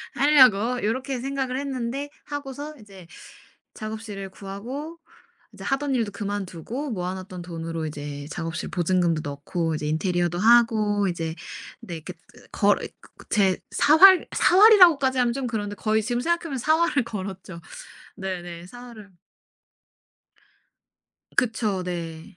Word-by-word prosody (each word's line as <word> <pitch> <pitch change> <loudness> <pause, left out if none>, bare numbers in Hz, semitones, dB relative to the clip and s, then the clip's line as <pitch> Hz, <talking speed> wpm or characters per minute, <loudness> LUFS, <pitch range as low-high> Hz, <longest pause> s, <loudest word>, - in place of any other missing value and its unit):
하려고.' 250 -5 +4
요렇게 255 +4 -2
생각을 265 -1 -2
했는데 275 0 -4 0.2
하고서 290 +1 -6
이제 195 -4 -14 0.7
작업실을 215 -3 -6
구하고 250 - -7 0.5
이제 - - -11
하던 275 0 -1
일도 225 -4 -1
그만두고 205 - -5
모아 180 -2 -3
놨던 185 -1 -8
돈으로 165 -2 -5
이제 145 -1 -7
작업실 165 -2 -4
보증금도 175 -3 +1
넣고 160 +3 -3
이제 150 0 -4
인테리어도 175 +2 0
하고 215 -2 +4
이제 165 -2 -3 0.5
네 170 - -7
이렇게 155 - -9 0.4
거 - - +3 0.5
제 195 -3 +2
사활 365 +5 +7
사활이라고까지 355 -10 +6
하면 240 -1 +2
좀 265 -1 -3
그런데 205 -3 -3
거의 220 +1 0
지금 240 +2 -1
생각해 340 +3 0
보면 280 -5 -4
사활을 315 -1 +2
걸었죠. 190 -4 -7 0.6
네네. 175 -2 -6
사활을 235 -2 -12 2.3
그쵸. 220 -5 0
네. 165 -2 -6
210 Hz, 285 characters per minute, -24 LUFS, 180-265 Hz, 2.3 s, 사활